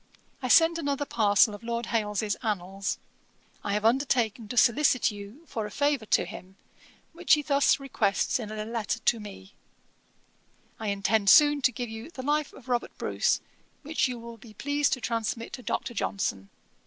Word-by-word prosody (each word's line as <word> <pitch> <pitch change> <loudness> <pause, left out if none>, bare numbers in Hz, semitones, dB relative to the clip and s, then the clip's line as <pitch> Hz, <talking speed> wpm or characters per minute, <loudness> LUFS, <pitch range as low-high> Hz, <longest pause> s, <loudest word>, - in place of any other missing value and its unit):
'I 255 - -2
send 330 +5 +5
another 285 -2 -1
parcel 210 -3 +3
of 205 - -9
Lord 235 0 -3
Hailes's 210 -2 -1
Annals, 195 -3 -2 0.7
I 200 - -2
have 210 +1 -1
undertaken 235 -3 +1
to 245 - -6
solicit 250 0 +4
you 205 +8 -10
for 220 -8 -4
a - - -9
favour 285 -1 0
to - - +2
him, 185 +1 -10 0.6
which 335 0 +4
he 295 - -3
thus 280 -1 +3
requests 240 -5 0
in 220 -3 -6
a 215 0 -4
letter 230 0 -2
to 230 0 +1
me: 200 - -11 1.3
"I 220 - -4
intend 200 +1 +1
soon 295 +2 +7
to 255 - +3
give 245 0 -5
you 225 +6 -8
The 260 -6 -8
Life 295 +1 0
of 265 - -16
Robert 245 -1 -2
Bruce, - - 0 0.4
which 305 0 0
you 250 -1 -5
will 235 0 -10
be 220 0 -15
pleased 285 +4 0
to 255 - -3
transmit 230 0 -3
to 255 - -6
Dr. 240 - -3
Johnson. 100 - -2
230 Hz, 175 wpm, -27 LUFS, 210-275 Hz, 1.3 s, soon